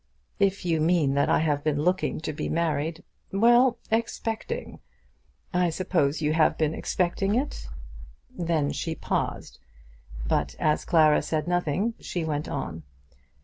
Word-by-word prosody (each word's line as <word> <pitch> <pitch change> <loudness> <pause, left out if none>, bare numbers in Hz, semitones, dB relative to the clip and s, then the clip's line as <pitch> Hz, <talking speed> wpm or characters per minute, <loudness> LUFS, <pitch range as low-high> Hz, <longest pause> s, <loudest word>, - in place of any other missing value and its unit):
"If 195 -1 +1
you 165 -2 +1
mean 160 -4 +3
that 140 0 +2
I - - +3
have 145 -2 0
been 150 -1 0
looking 180 -1 +1
to 155 - -3
be - - -4
married 160 0 -1 0.2
" - - -42
"Well; 240 +5 +5
expecting. 230 - -2 0.7
I 180 -1 +2
suppose 160 -3 0
you 150 +1 +2
have 160 -1 +3
been 155 -1 +1
expecting 190 +5 0
it." 270 +4 -2 0.6
Then 170 - -1
she 165 -1 -3
paused; - - -3 0.7
but - - 0
as 150 -1 +1
Clara 155 -4 +5
said 155 0 -2
nothing, 175 +5 0
she 175 -3 -3
went 150 -1 -2
on. 85 - -4
165 Hz, 145 wpm, -26 LUFS, 150-190 Hz, 0.7 s, Well